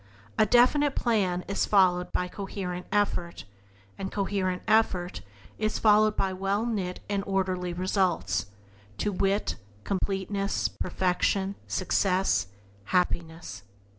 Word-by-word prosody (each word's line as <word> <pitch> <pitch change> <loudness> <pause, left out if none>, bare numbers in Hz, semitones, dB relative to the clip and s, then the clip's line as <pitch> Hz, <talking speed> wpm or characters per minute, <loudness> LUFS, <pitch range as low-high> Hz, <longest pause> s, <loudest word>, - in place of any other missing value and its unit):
A 215 - +3
definite 265 +5 +4
plan 190 -7 +1
is 200 - 0
followed 180 -3 +3
by 180 - -1
coherent 180 -2 -5
effort; 195 - -1 0.5
and 195 0 -4
coherent 190 -2 -1
effort 185 -5 +2 0.4
is 215 0 0
followed 215 0 +4
by 190 -1 0
well 195 +4 -1
knit 195 -6 -2
and 200 -1 -1
orderly 185 -2 -1
results 185 - 0 0.3
— 100 +1 -27
to 210 - 0
wit, 195 -2 0 0.3
completeness, 195 - -1
perfection, 190 +2 0
success, 185 - +1 0.4
happiness. 165 - -1
190 Hz, 110 wpm, -27 LUFS, 180-205 Hz, 0.5 s, definite